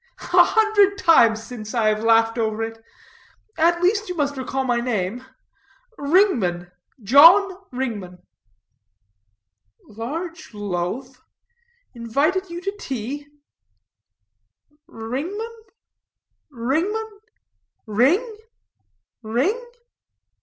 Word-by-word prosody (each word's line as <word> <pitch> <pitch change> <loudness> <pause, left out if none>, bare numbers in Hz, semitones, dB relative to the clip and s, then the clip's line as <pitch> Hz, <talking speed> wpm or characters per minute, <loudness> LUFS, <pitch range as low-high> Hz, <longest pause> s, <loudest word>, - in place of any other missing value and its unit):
A - - +8
hundred 415 -2 +3
times 230 - +4
since, 225 -2 -8
I 220 -2 +2
have 215 +1 -1
laughed 225 0 +3
over 220 0 -1
it. 225 0 -7 0.7
At 340 +2 +2
least 410 +2 +1
you 360 - -4
must 285 -1 -1
recall 265 0 -3
my 245 -2 0
name 235 -1 -2 0.7
Ringman, 245 - +1 0.3
John 335 - +7 0.2
Ringman." 220 -9 -5 1.7
"Large 295 - -7
loaf? 205 +7 -4 0.7
Invited 285 - -1
you 340 +1 -7
to 395 +2 -4
tea? 270 - -5 1.6
Ringman? 330 - -5 1.0
Ringman? 375 - -2 0.7
Ring? 320 - +1 0.8
Ring?" 275 - -1
265 Hz, 85 wpm, -22 LUFS, 225-360 Hz, 1.7 s, A